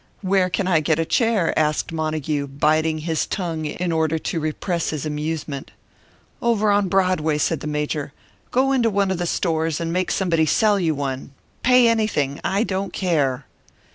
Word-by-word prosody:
"Where 190 Hz, -1 st, +2 dB
can 180 Hz, +2 st, -1 dB
I 170 Hz, -4 st, +4 dB
get 155 Hz, 0 st, +1 dB
a 165 Hz, -, 0 dB
chair?" 225 Hz, -3 st, +2 dB
asked 155 Hz, +2 st, 0 dB
Montague, 155 Hz, -2 st, -2 dB
biting 155 Hz, +3 st, +1 dB
his 160 Hz, 0 st, -1 dB
tongue 165 Hz, -5 st, -3 dB
in 170 Hz, +4 st, -2 dB
order 160 Hz, -1 st, +1 dB
to 165 Hz, +2 st, -3 dB
repress 160 Hz, +2 st, -2 dB
his 155 Hz, -1 st, -3 dB
amusement. 150 Hz, -2 st, -4 dB, 0.7 s
"Over 215 Hz, -3 st, +2 dB
on 205 Hz, -1 st, +2 dB
Broadway," 180 Hz, -5 st, +2 dB
said 155 Hz, +1 st, 0 dB
the 150 Hz, -, -6 dB
Major. 150 Hz, -1 st, -2 dB, 0.4 s
"Go 265 Hz, +2 st, +2 dB
into 245 Hz, -4 st, +3 dB
one 200 Hz, -2 st, +1 dB
of 185 Hz, -, -2 dB
the 175 Hz, -, -1 dB
stores, 160 Hz, -3 st, 0 dB
and 165 Hz, 0 st, -2 dB
make 185 Hz, 0 st, 0 dB
somebody 165 Hz, -4 st, +1 dB
sell 205 Hz, +6 st, +3 dB
you 165 Hz, -4 st, +1 dB
one. 135 Hz, -1 st, -4 dB, 0.3 s
Pay 250 Hz, -1 st, +5 dB
anything 215 Hz, -12 st, 0 dB
I 200 Hz, +3 st, +1 dB
don't 195 Hz, -2 st, -2 dB
care." 145 Hz, -8 st, 0 dB
165 Hz, 170 wpm, -22 LUFS, 155-190 Hz, 0.7 s, Pay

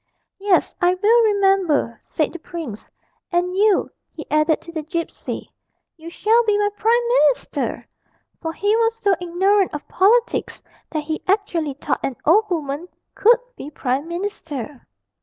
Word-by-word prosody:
'Yes, 390 Hz, -2 st, +2 dB
I 355 Hz, +1 st, +4 dB
will 445 Hz, +5 st, +4 dB
remember,' 390 Hz, -, +2 dB
said 310 Hz, -, -2 dB
the 345 Hz, -, -7 dB
prince; 315 Hz, -, -8 dB, 0.4 s
'and 355 Hz, +1 st, 0 dB
you,' 410 Hz, 0 st, +3 dB, 0.2 s
he 310 Hz, -, -9 dB
added 305 Hz, +1 st, +3 dB
to 335 Hz, -, -11 dB
the 320 Hz, -2 st, -4 dB
gipsy, 330 Hz, +2 st, -5 dB, 0.4 s
'you 330 Hz, 0 st, -10 dB
shall 445 Hz, +7 st, +2 dB
be 420 Hz, -1 st, +2 dB
my 415 Hz, 0 st, +2 dB
prime 465 Hz, +3 st, +2 dB, 0.2 s
minister!' 255 Hz, -4 st, -1 dB, 0.5 s
for 325 Hz, -, -3 dB
he 410 Hz, +6 st, +1 dB
was 455 Hz, 0 st, +2 dB
so 405 Hz, -3 st, +2 dB
ignorant 380 Hz, +3 st, +2 dB
of 295 Hz, -, -7 dB
politics 455 Hz, +6 st, +1 dB, 0.3 s
that 310 Hz, -2 st, -3 dB
he 315 Hz, +1 st, -4 dB
actually 350 Hz, -8 st, 0 dB
thought 285 Hz, -, -2 dB
an 265 Hz, -, -3 dB
old 420 Hz, +7 st, +4 dB
woman 310 Hz, -1 st, -3 dB, 0.3 s
could 465 Hz, +3 st, +5 dB, 0.2 s
be 290 Hz, -, -8 dB
prime 275 Hz, 0 st, -2 dB
minister. 325 Hz, -, -6 dB
350 Hz, 150 wpm, -21 LUFS, 305-410 Hz, 0.5 s, could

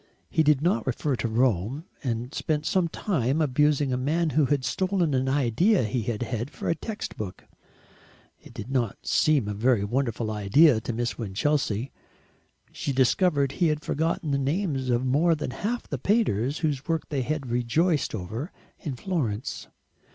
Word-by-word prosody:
He -, -, +3 dB
did 150 Hz, -2 st, +3 dB
not 135 Hz, -10 st, +1 dB
refer 130 Hz, +2 st, 0 dB
to 115 Hz, -, -1 dB
Rome, 120 Hz, -, 0 dB, 0.2 s
and 120 Hz, +1 st, -3 dB
spent 150 Hz, -1 st, -1 dB
some 180 Hz, 0 st, +2 dB
time 155 Hz, -, -1 dB
abusing 150 Hz, -1 st, +2 dB
a -, -, +1 dB
man 155 Hz, +5 st, 0 dB
who 150 Hz, -1 st, +3 dB
had 140 Hz, -1 st, 0 dB
stolen 185 Hz, +2 st, 0 dB
an 130 Hz, 0 st, +1 dB
idea 140 Hz, -, +3 dB
he 115 Hz, +3 st, -1 dB
had 115 Hz, +1 st, -2 dB
had 120 Hz, +1 st, -3 dB
for -, -, -6 dB
a -, -, +3 dB
text 215 Hz, +5 st, -6 dB
book. 95 Hz, -3 st, -6 dB, 1.0 s
It -, -, -15 dB
did 120 Hz, -, -7 dB
not 120 Hz, -6 st, 0 dB
seem 145 Hz, -8 st, +3 dB
a 105 Hz, -, -2 dB
very 115 Hz, 0 st, +2 dB
wonderful 115 Hz, 0 st, -1 dB
idea 110 Hz, +5 st, +4 dB
to 120 Hz, -, -3 dB
Miss 115 Hz, -3 st, -2 dB
Winchelsea. 115 Hz, +2 st, -1 dB, 0.8 s
She -, -, -3 dB
discovered 140 Hz, +2 st, +2 dB
he 175 Hz, +3 st, +1 dB
had 150 Hz, -1 st, -1 dB
forgotten 160 Hz, +1 st, -1 dB
the 140 Hz, -, +1 dB
names 140 Hz, -2 st, -1 dB
of 120 Hz, +1 st, +1 dB
more 155 Hz, +6 st, +3 dB
than 150 Hz, -, -4 dB
half 225 Hz, -, -3 dB
the 140 Hz, -, -4 dB
painters 145 Hz, -, +1 dB
whose 140 Hz, -3 st, -2 dB
work 165 Hz, -2 st, -1 dB
they 140 Hz, -3 st, -1 dB
had 140 Hz, -1 st, -3 dB
rejoiced 130 Hz, +6 st, +1 dB
over 110 Hz, -, -5 dB, 0.3 s
in 145 Hz, -6 st, -4 dB
Florence. 125 Hz, -, -3 dB
135 Hz, 170 wpm, -26 LUFS, 120-155 Hz, 1.0 s, idea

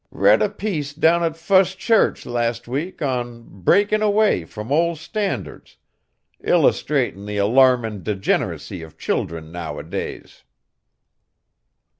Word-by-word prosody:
Read 100 Hz, +3 st, +4 dB
a -, -, +2 dB
piece 180 Hz, -9 st, -4 dB
down 165 Hz, +2 st, +3 dB
at 165 Hz, -1 st, -1 dB
Fust 190 Hz, +2 st, +3 dB
Church 225 Hz, +3 st, +2 dB
last 120 Hz, -1 st, -2 dB
week 150 Hz, +8 st, -4 dB
on 120 Hz, -3 st, -3 dB
'Breakin' 205 Hz, -, +2 dB
Away 210 Hz, -, +2 dB
from 105 Hz, +8 st, -8 dB
Old 170 Hz, +2 st, +2 dB
Standards,' 200 Hz, +6 st, -5 dB, 0.7 s
illustratin' 100 Hz, +3 st, +1 dB
the 105 Hz, 0 st, -4 dB
alarmin' 115 Hz, -1 st, +3 dB
degen'racy 95 Hz, -4 st, -2 dB
of 80 Hz, -1 st, -12 dB
children 80 Hz, -1 st, -3 dB
nowadays." 85 Hz, -2 st, -6 dB
130 Hz, 110 wpm, -21 LUFS, -, 0.7 s, Read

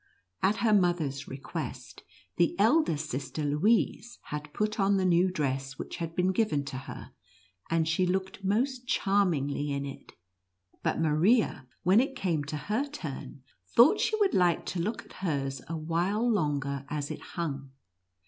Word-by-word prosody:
At 200 Hz, +3 st, +3 dB
her 220 Hz, -, +4 dB
mother's 170 Hz, -8 st, +1 dB
request, 135 Hz, +1 st, -6 dB, 0.4 s
the 170 Hz, -1 st, +3 dB
elder 225 Hz, -, +4 dB
sister, 150 Hz, 0 st, -4 dB
Louise, 210 Hz, +10 st, +1 dB
had 150 Hz, 0 st, -6 dB
put 215 Hz, +5 st, -1 dB
on 195 Hz, 0 st, +3 dB
the 190 Hz, -, +1 dB
new 180 Hz, +1 st, +4 dB
dress 135 Hz, -5 st, -2 dB
which -, -, -6 dB
had 165 Hz, -1 st, -5 dB
been 185 Hz, +1 st, +2 dB
given 185 Hz, -9 st, +1 dB
to 130 Hz, -, -5 dB
her, -, -, -8 dB, 0.6 s
and 165 Hz, -1 st, +2 dB
she 180 Hz, +3 st, +2 dB
looked 190 Hz, +1 st, -2 dB
most 245 Hz, +6 st, 0 dB
charm 200 Hz, -5 st, +3 dB
ingly 145 Hz, 0 st, -2 dB
in 140 Hz, 0 st, -2 dB
it, 140 Hz, -, -9 dB, 0.7 s
but -, -, 0 dB
Maria, 160 Hz, -, +2 dB, 0.2 s
when 185 Hz, +5 st, +5 dB
it 270 Hz, +2 st, 0 dB
came 170 Hz, -, 0 dB
to 150 Hz, +2 st, -4 dB
her 220 Hz, -, -2 dB
turn, 150 Hz, -, -7 dB, 0.3 s
thought 270 Hz, -, +7 dB
she 435 Hz, -, +1 dB
would 400 Hz, -2 st, +3 dB
like 175 Hz, -2 st, +3 dB
to 180 Hz, -, -3 dB
look 215 Hz, +6 st, -3 dB
at -, -, -16 dB
hers 135 Hz, -7 st, -1 dB
a 165 Hz, +2 st, -3 dB
while 175 Hz, +8 st, 0 dB
longer 145 Hz, -, 0 dB
as 145 Hz, -1 st, -3 dB
it -, -, -6 dB
hung. 140 Hz, -5 st, -4 dB
170 Hz, 165 wpm, -29 LUFS, 145-205 Hz, 0.7 s, thought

